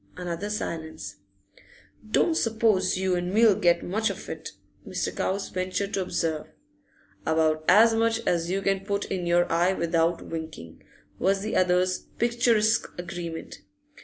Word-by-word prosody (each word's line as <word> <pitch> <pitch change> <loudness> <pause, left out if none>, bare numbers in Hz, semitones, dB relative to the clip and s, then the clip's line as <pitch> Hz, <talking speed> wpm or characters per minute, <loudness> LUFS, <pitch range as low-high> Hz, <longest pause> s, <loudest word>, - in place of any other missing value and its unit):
Another 180 +3 -4
silence. 160 - -5 0.9
'Don't 325 - +3
suppose 220 - +2
you 190 0 0
and 175 0 -2
me 225 +4 +5
'll 215 - +7
get 175 -2 +2
much 220 +5 0
of - - -7
it,' - - -7 0.3
Mr. - - -3
Cowes 195 +1 -2
ventured 185 +2 -2
to 195 - 0
observe. 165 -4 -2 0.8
'About 160 -1 +1
as 220 +5 +7
much 225 0 +2
as 170 -1 0
you 195 +2 -1
can 195 0 +1
put 200 0 -2
in 180 -2 -2
your 175 0 +4
eye 175 +3 +3
without 170 -1 0
winkin',' 160 - -7 0.4
was 195 +1 +2
the 215 - -3
other's 185 0 +2 0.2
picturesque 235 -2 +2
agreement. 170 -2 -6
185 Hz, 145 wpm, -26 LUFS, 170-210 Hz, 0.9 s, ll